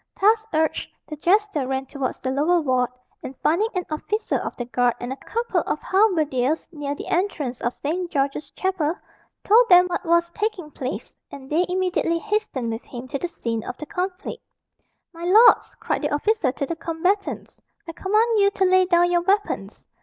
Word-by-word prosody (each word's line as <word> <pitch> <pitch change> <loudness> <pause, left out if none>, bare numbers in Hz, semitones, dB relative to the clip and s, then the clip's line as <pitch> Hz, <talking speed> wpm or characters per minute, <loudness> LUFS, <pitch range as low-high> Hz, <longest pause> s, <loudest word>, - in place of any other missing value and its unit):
Thus 430 +3 +4
urged, 315 0 0 0.2
the 305 - -6
jester 350 -3 +1
ran 265 0 -2
towards 270 -1 -4
the 260 - -2
lower 310 +6 +2
ward, 255 -5 +1 0.3
and 260 - -8
finding 350 +8 +3
an 365 -2 -1
officer 420 +8 -1
of - - -5
the 240 - -3
guard 245 -1 +1
and 245 +2 -4
a - - -10
couple 465 - -1
of - - 0
halberdiers 315 - +1
near 290 -3 -4
the - - -7
entrance 310 -9 -1
of 240 - 0
St. 345 +5 -3
George's 280 0 -1
Chapel, 360 -4 -1 0.5
told 470 +4 +5
them 360 0 +8
what 355 -1 -3
was 340 0 +2
taking 395 -6 -3
place, 265 0 -6
and 270 0 -11
they 345 +4 +2
immediately 360 -2 0
hastened 415 - -2
with 225 - -7
him 250 0 -9
to 275 - -3
the 350 - -2
scene 230 -9 -4
of 250 - -6
the 305 - -7
conflict. 365 +1 -4 0.7
"My 335 0 -9
lords!" 430 +7 +6
cried - - -2
the - - 0
officer 360 - +1
to 280 - -3
the 335 - -4
combatants, 360 +5 -2 0.3
"I - - -4
command 430 +6 +1
you 400 0 +5
to 385 - +2
lay 370 0 +5
down 350 0 +3
your 345 0 +3
weapons." 400 +4 -1
335 Hz, 185 wpm, -23 LUFS, 275-380 Hz, 0.7 s, them